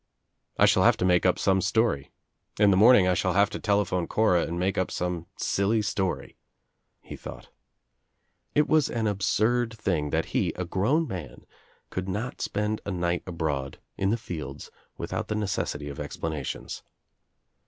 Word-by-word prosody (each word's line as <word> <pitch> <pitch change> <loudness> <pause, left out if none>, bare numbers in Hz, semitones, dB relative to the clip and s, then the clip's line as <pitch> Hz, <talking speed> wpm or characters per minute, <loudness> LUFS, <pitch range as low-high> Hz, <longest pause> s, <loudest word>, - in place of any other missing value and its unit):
"I - - +6
shall - - +4
have - - +5
to - - 0
make 90 0 +4
up 90 - +2
some 95 -1 +2
story. 100 -8 +1 0.5
In 105 -1 +6
the - - +4
morning 105 -1 +7
I 90 - +3
shall 90 +1 0
have 100 +2 +3
to - - -5
tele 100 -1 +2
phone 90 -2 -2
Cora 90 -6 +2
and 85 - -4
make 95 +3 0
up 95 - 0
some 90 -1 -3
silly 105 +3 +1
story," 95 -2 -2 0.6
he - - -9
thought. - - -10 1.1
It 150 - +4
was 155 -3 +3
an 115 -2 -1
absurd 110 +4 +1
thing 85 -8 -1
that - - 0
he, - - +1
a 90 - -4
grown 120 - +1
man, 85 - -7 0.5
could 95 +1 -3
not 105 +7 -4
spend 105 +1 -1
a - - -5
night 90 -2 -1
abroad, 75 -6 -3 0.2
in 95 - 0
the 115 - +2
fields 75 - -7 0.3
without - - -4
the 105 - -2
necessity 95 -8 -2
of 70 -2 -7
explanations. 80 -4 -5
95 Hz, 170 wpm, -27 LUFS, 85-105 Hz, 1.1 s, morning